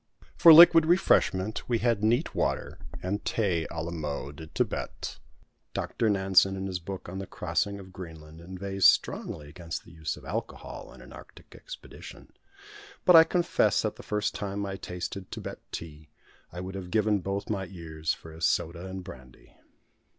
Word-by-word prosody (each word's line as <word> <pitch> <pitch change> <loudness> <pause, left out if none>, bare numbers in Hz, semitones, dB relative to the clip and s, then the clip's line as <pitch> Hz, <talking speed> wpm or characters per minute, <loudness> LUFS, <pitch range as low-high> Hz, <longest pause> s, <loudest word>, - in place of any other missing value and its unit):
For 165 - +8
liquid 165 0 +9
refreshment 110 - +2
we 120 - +2
had 115 -2 +1
neat 120 +8 +2
water, - - -2 0.2
and 100 +3 -2
thé 90 -7 0
à 80 -1 -5
la 85 - -4
mode 75 -3 -4
de 80 -1 -9
Thibet. - - -3 0.6
Doctor 115 - -1
Nansen, 95 -1 +4
in 95 0 -4
his 95 -2 -3
book 95 +2 -7
on 95 +2 -6
the 95 - -6
crossing 100 0 -2
of 95 -1 -12
Greenland, 80 -3 -10
inveighs 95 +2 +1
strongly 75 - +1
against 80 +2 -7
the - - -15
use 80 -2 -4
of - - -13
alcohol - - -6
in - - -14
an - - -13
Arctic - - -14
expedition; - - -11 0.7
but 180 - +7
I 160 - +11
confess 175 +1 +1
that - - -2
the - - -9
first 105 0 -1
time 100 0 -3
I 95 -1 -4
tasted 90 +1 -6
Thibet - - -7
tea 75 -2 -8 0.4
I 90 - -6
would 95 +1 -6
have 95 -2 -6
given 105 0 +2
both 100 +2 -3
my 95 -3 -2
ears 80 -4 -4
for 80 - -7
a 80 +1 -12
soda 85 +3 0
and 95 0 -6
brandy. 65 -5 -13
95 Hz, 170 wpm, -28 LUFS, 85-105 Hz, 0.7 s, I